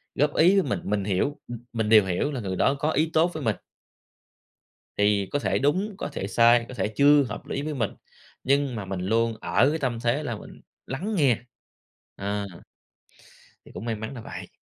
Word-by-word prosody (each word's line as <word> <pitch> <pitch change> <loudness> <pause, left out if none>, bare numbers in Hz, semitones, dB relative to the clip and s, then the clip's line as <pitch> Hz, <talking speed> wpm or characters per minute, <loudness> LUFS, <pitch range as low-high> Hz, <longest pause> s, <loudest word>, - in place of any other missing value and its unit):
góp 145 +1 +1
ý 185 +5 +5
với 145 - -1
mình, - - 0
mình 105 -1 -1
hiểu, 100 +9 -1
m 120 - -5 0.2
mình 110 -2 -1
đều 110 -3 +7
hiểu 95 +10 -1
là 135 - -3
người 95 -3 -3
đó 135 - +3
có 150 +2 +1
ý 155 +2 +1
tốt 165 +3 +3
với 155 - -5
mình. 110 -4 +1 1.4
Thì 105 -2 +2
có 145 - 0
thể - - 0
đúng, 185 +9 0
có - - -4
thể 95 - -3
sai, 115 +2 +4
có - - -7
thể 115 - -1
chưa 145 0 +6
hợp 115 -3 -7
lý 140 - -3
với 155 +1 -3
mình. 115 -6 -1 0.5
Nhưng 140 -1 +1
mà 105 -3 -5
mình 95 -1 -4
luôn 115 +4 +1
ở 130 +5 +3
cái 160 +2 -2
tâm 125 -5 -2
thế 120 +6 0
là 120 -6 -3
mình - - -12 0.2
lắng 190 +12 -3
nghe, 140 - +3 0.8
ờ, 100 +1 -3 1.2
thì - - -14
cũng 110 - -7
may 115 -2 -1
mắn 110 +4 -6
là 120 - -7
vậy. - - -8
120 Hz, 210 wpm, -25 LUFS, 105-145 Hz, 1.4 s, đều